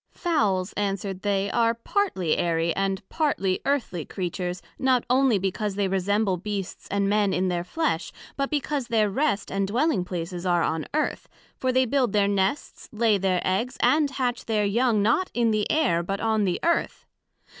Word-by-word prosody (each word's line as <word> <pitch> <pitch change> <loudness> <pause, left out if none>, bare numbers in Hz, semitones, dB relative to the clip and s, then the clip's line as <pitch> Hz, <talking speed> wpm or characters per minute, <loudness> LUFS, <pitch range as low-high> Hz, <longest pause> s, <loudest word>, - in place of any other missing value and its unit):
Fowls, 210 - 0
answered 195 -2 -2
they, 200 -1 0
are 230 -1 +2
partly 230 - 0
Airy, 165 -1 0
and 195 -1 -2
partly 195 - 0
Earthly 245 - -1
Creatures, 180 0 -4 0.2
not 260 -2 +2
onely 260 -3 +4
because 195 +2 -2
they 200 -1 +1
resemble 195 +1 +1
Beasts 200 0 -5
and 200 0 0
Men 205 -1 +2
in 185 +1 +1
their 175 -1 -1
flesh, 245 - -2 0.2
but 275 -1 -1
because 290 -3 -2
their 220 -3 +2
rest 260 -3 0
and 195 0 0
dwelling 240 - +1
places 175 0 -5
are 175 -2 +2
on 160 -1 -1
Earth; 310 - -1 0.3
for 260 - 0
they 260 +1 +3
build 250 -3 +1
their 205 -1 +3
Nests, 200 +6 -1
lay 220 -2 +2
their 185 -1 +1
Eggs, 210 +7 -1
and 300 -1 +3
hatch 255 -3 -2
their 215 -2 +1
Young, 220 0 +2
not 235 - +2
in 235 -2 +2
the 215 -1 0
Air, 270 - +2
but 195 +3 -3
on 220 -2 +1
the 180 -2 0
Earth. 340 0 0
205 Hz, 175 wpm, -25 LUFS, 190-250 Hz, 0.3 s, onely